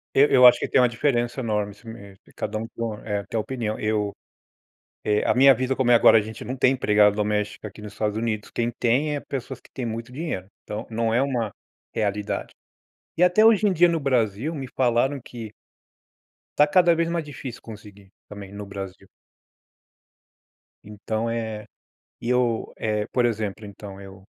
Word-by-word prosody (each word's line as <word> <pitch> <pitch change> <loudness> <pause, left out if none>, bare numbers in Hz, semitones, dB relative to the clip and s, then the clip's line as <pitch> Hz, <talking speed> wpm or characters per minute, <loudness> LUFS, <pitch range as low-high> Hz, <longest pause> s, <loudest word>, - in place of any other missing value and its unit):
Eu 140 - +7
eu 125 -2 +7
acho 120 -1 +8
que - - -3
tem - - +4
uma 125 - +5
diferença 120 0 0
enorme, 105 -4 -1
isso 105 +4 -19
mesmo, 100 -3 -11
e - - -20
cada 110 - -4
um 115 - -4
com 115 -2 -3
eh, 105 -2 -2
tem 115 - -2
uma - - 0
opinião. 110 -2 -3
Eu, 105 -1 -1 0.9
eh, 105 0 +1
a - - +4
minha 135 +1 +7
vida, 130 +1 -1
como 130 -2 +1
é - - +8
agora, 115 - +7
a - - 0
gente 110 +1 -8
não 130 - -4
tem 130 0 +3
empregada 105 -4 +3
doméstica 105 0 -2
aqui 105 +1 -12
nos 105 -1 -9
Estados 105 -1 -2
Unidos. 110 -2 -3
Quem 120 0 -1
tem 140 +6 +2
é - - -2
pessoas 135 -2 -6
que - - -22
têm 125 -3 -4
muito 115 +2 -5
dinheiro. 130 - -4 0.2
Então, 105 +2 -6
não 115 0 0
é 125 - +3
uma 125 -6 -1 0.4
realidade. 105 -1 -2 0.6
E 180 - +4
até 180 +4 +5
hoje 220 -2 +5
em 190 - +2
dia 175 +1 +5
no 165 -1 0
Brasil 125 +1 0
me 135 -4 -5
falaram 130 +2 +2
que 115 -3 -8 1.1
tá 150 - +7
cada 175 +1 +4
vez 165 0 0
mais 170 -1 -1
difícil 135 -4 -8
conseguir, 100 -3 -13 0.2
também 100 -1 -9
no 100 0 -7
Brasil. 95 -1 -8 1.8
Então 110 +2 -3
é, 110 -2 -4 0.5
e 115 - -5
eu, 125 -2 +1
eh, 105 -1 -1
por 125 -1 +3
exemplo, 110 -2 -3
então 100 -1 -10
eu 95 -1 -12
115 Hz, 190 wpm, -24 LUFS, 105-130 Hz, 1.8 s, acho